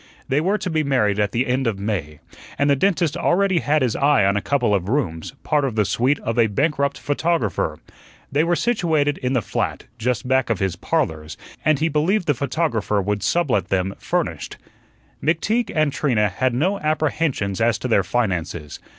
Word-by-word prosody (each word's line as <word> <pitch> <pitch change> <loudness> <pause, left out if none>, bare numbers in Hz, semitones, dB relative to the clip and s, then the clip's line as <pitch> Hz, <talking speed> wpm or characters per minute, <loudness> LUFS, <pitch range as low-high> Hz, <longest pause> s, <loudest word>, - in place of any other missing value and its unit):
They 140 +3 +1
were 195 +6 +1
to 205 -3 -4
be 155 -1 +1
married 110 -8 +1
at 105 -1 +1
the 120 +3 0
end 130 0 0
of 110 -4 -1
May, 95 -8 -3 0.4
and 145 0 +2
the - - +5
dentist 170 -1 +1
already 190 0 +2
had 150 -2 +1
his 120 -4 0
eye 140 -7 +3
on 100 +1 +2
a 105 - 0
couple 125 -5 +1
of 95 -1 0
rooms, 115 - -2
part 150 -2 +1
of 130 -5 -2
the 105 -2 +2
suite 130 +8 +1
of 115 +1 -2
a 115 - +5
bankrupt 140 +5 0
photographer. 145 - -1 0.5
They 145 +3 +2
were 175 +1 +2
situated 160 -10 +1
in 130 0 -1
the 125 -5 +1
flat, - - -2 0.2
just 125 +1 -1
back 130 -1 +2
of 115 - +1
his 95 -1 -1
"Parlors," 80 -3 -2 0.3
and 155 -1 +3
he 160 - +1
believed 165 +6 +1
the 150 - +2
photographer 130 -6 -1
would 100 +1 -1
sublet 145 - +1
them 95 0 0
furnished. - - -3 0.7
McTeague 215 +10 +1
and 155 -3 +2
Trina 110 -8 +1
had 125 +6 -1
no 185 +10 +1
apprehensions 150 - -1
as 115 -2 +3
to 105 - -4
their 105 -5 +3
finances. 90 -7 -2
130 Hz, 190 wpm, -21 LUFS, 105-155 Hz, 0.7 s, the